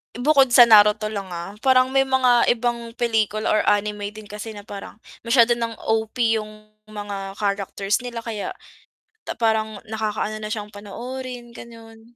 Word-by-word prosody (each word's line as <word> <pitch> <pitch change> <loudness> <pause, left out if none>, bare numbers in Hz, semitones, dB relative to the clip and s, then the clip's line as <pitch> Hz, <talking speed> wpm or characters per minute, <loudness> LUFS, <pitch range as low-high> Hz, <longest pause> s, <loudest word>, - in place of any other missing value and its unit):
bukod 275 +2 +4
sa 245 - +10
Naruto 215 -1 +5
lang, 200 -2 -5
ah, 170 +3 -6
parang 260 0 +3
may 270 0 +2
mga 255 -2 +3
ibang 235 0 -3
pelikula 215 -2 0
or 215 - +3
anime 205 0 +1
din 215 - -9
kasi 210 +1 -8
na 205 - -9
parang 200 0 -9 0.3
masyado 235 0 +5
ng 230 -1 -3
OP 225 +1 +1
yung 215 0 -11 0.2
mga 200 -2 -6
characters 200 +1 -1
nila 240 -2 -6
kaya 220 -3 -5 0.8
parang 220 -2 0
nakakaano 215 0 -3
na 215 - -4
siyang 210 -1 -5
panoorin, 240 +4 -8
gano'n. 230 0 -14
220 Hz, 150 wpm, -22 LUFS, 210-240 Hz, 0.8 s, sa